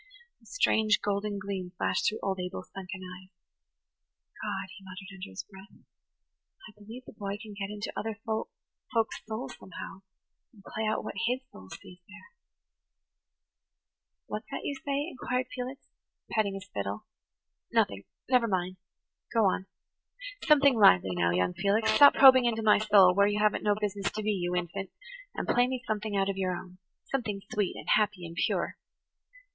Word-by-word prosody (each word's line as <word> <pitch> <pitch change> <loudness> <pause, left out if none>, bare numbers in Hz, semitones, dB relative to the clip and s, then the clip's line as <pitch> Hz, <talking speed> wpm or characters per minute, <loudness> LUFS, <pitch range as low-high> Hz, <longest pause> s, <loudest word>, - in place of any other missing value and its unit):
The - - -22
strange, 220 - +3
golden 205 0 -1
gleam 195 -2 -5
flashed - - +1
through 215 - -5
old 190 -1 -1
Abel's 180 0 -6
sunken 190 0 -7
eyes. 185 0 -10 1.1
"God," 185 - -4
he 195 - -13
muttered 190 +1 -10
under 185 - -8
his 95 - -6
breath, 195 0 -15 0.9
"I - - -13
believe 220 +5 -11
the - - -12
boy 200 -1 -4
can 215 -1 -10
get 200 -1 -4
into 210 0 -5
other 220 -1 -3
folk's 225 - -3
souls 220 -12 -5
somehow, 190 +1 -9 0.5
and 205 -4 -18
play 220 +2 -3
out 215 - 0
what - - -5
his 250 +2 0
soul 95 0 -13
sees 180 - -11
there." 210 - -15 1.9
"What's 215 +2 -6
that - - -4
you - - -2
say? 280 +1 -2
"inquired 255 -4 -2
Felix, 255 +2 -6 0.5
petting 205 -3 +1
his 195 -1 -8
fiddle. 100 0 -4 0.7
"Nothing–never 230 - +1
mind–go 185 +3 -3
on. 190 0 +1 0.8
Something 280 -5 +6
lively 95 - +6
now, 85 -1 +2
young 90 +1 +1
Felix. 220 - +2
Stop 285 +6 +8
probing 260 -2 +8
into 225 -2 0
my 210 -1 +5
soul, 205 -4 +6
where 200 +2 +4
you 205 0 0
haven't 210 0 +2
no 210 -1 +3
business 205 -1 -1
to 215 - -3
be, 215 - +1
you 180 -3 -1
infant, 180 +2 -3 0.5
and - - -3
play 245 +1 +3
me 255 -1 -3
something 215 -1 -2
out 195 0 +2
of 195 -1 -2
your 185 -1 0
own–something 190 +4 -6
sweet 205 -3 0
and - - -9
happy 205 -4 +2
and 165 0 -8
pure." - - -1
205 Hz, 160 wpm, -29 LUFS, 185-220 Hz, 1.9 s, Stop